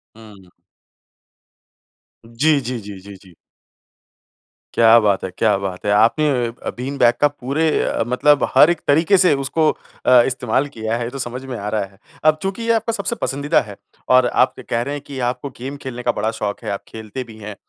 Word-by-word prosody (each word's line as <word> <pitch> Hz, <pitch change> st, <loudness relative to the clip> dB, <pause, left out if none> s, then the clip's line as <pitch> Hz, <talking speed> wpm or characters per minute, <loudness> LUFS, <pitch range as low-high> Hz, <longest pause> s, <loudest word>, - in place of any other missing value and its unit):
हुँ। 105 Hz, -5 st, -15 dB, 1.8 s
जी, 140 Hz, +6 st, +1 dB
जी, 125 Hz, 0 st, -4 dB
जी, 100 Hz, -2 st, -9 dB
जी, 100 Hz, +1 st, -12 dB
जी। 95 Hz, -3 st, -20 dB, 1.4 s
क्या 115 Hz, 0 st, +6 dB
बात 100 Hz, -3 st, +1 dB
है, 95 Hz, -, -3 dB
क्या 110 Hz, -3 st, +3 dB
बात 95 Hz, -1 st, -6 dB
है! 100 Hz, -, +1 dB
आपने 115 Hz, +9 st, +3 dB, 0.2 s
अ 115 Hz, -, -5 dB
अ, -, -, -1 dB
बीन 135 Hz, +3 st, -4 dB
बैग 120 Hz, -2 st, +5 dB
का 145 Hz, -, +6 dB
पूरे 145 Hz, +3 st, -1 dB
अ, -, -, -1 dB
मतलब 145 Hz, +4 st, +3 dB
हर 150 Hz, -, +7 dB
एक 175 Hz, -2 st, -1 dB
तरीके 165 Hz, +7 st, +4 dB
से 180 Hz, -4 st, +4 dB
उसको 155 Hz, +3 st, +1 dB, 0.4 s
अ, 125 Hz, -1 st, +7 dB
इस्तेमाल 130 Hz, +1 st, -1 dB
किया 110 Hz, 0 st, -2 dB
है, 120 Hz, -, -3 dB
ये 115 Hz, -, -4 dB
तो 135 Hz, -, -8 dB
समझ 125 Hz, +1 st, -5 dB
में 125 Hz, -3 st, -5 dB
आ 100 Hz, -, -5 dB
रहा 105 Hz, -2 st, -1 dB
है। 95 Hz, 0 st, -20 dB, 0.3 s
अब 155 Hz, 0 st, +5 dB
चूँकि 195 Hz, +4 st, -3 dB
ये 230 Hz, -, +1 dB
आपका 225 Hz, +1 st, -1 dB
सबसे 235 Hz, -, -2 dB
पसंदीदा 140 Hz, +2 st, +1 dB
है, 105 Hz, -3 st, -10 dB, 0.3 s
और 130 Hz, -1 st, +5 dB
आप -, -, +2 dB
के -, -, -11 dB
कह 115 Hz, 0 st, -2 dB
रहे 140 Hz, +4 st, -3 dB
हैं 145 Hz, -, -6 dB
कि 135 Hz, -2 st, -7 dB
आपको 125 Hz, +3 st, -5 dB
गेम 135 Hz, +3 st, -6 dB
खेलने 125 Hz, -2 st, -6 dB
का 120 Hz, -, +2 dB
बड़ा 110 Hz, +1 st, -2 dB
शौक़ 105 Hz, -2 st, -5 dB
है, -, -, -2 dB
आप 100 Hz, -, -5 dB
खेलते 110 Hz, +3 st, -7 dB
भी 110 Hz, -2 st, -14 dB
हैं। 105 Hz, -1 st, -8 dB
125 Hz, 210 wpm, -19 LUFS, 110-145 Hz, 1.8 s, हर